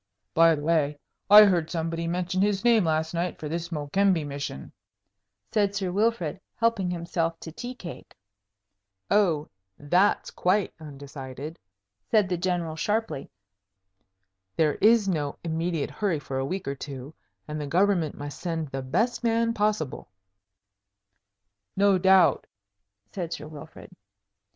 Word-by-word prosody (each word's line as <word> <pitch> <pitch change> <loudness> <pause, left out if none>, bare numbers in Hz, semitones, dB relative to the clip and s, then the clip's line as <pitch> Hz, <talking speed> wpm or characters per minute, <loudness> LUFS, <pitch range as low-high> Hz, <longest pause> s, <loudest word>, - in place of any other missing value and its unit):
"By 165 0 +6
the 145 - -6
way, 150 -2 +1 0.3
I 210 +1 +11
heard 175 -5 +1
somebody 165 0 -2
mention 180 +2 -1
his 200 0 +1
name 230 -5 +5
last 160 0 0
night 175 0 -2
for 155 - -6
this 170 +2 -4
Mokembe 165 +2 +1
mission," 140 - -6 0.8
said 205 -2 +1
Sir 190 -3 -1
Wilfrid, 195 -4 0
helping 230 -5 +1
himself 170 -1 -2
to 160 - -7
tea 245 +8 -7
cake. 175 -8 -10 1.0
"Oh, 170 -8 +3 0.3
that's 180 +8 +2
quite 185 +2 +1
undecided," 140 0 -8 0.5
said 210 -4 +3
the 180 - 0
General, 175 -3 -1
sharply. 210 -2 -2 1.3
"There 155 -2 +3
is 220 -1 +5
no 150 -6 -1
immediate 165 -2 -2
hurry 180 +2 -1
for 135 -2 -4
a 135 - -1
week 185 +2 -4
or 140 - -1
two, 140 +1 -8 0.3
and 150 0 -4
the 145 - -4
government 175 -1 +1
must 145 0 -7
send 165 -4 -3
the 135 0 -4
best 190 - 0
man 230 0 +2
possible." 210 - -1 1.7
"No 200 -1 +4
doubt," 185 -5 +4 0.6
said 175 -4 -4
Sir 150 - -7
Wilfrid. 155 +4 -12
170 Hz, 135 wpm, -26 LUFS, 150-195 Hz, 1.7 s, I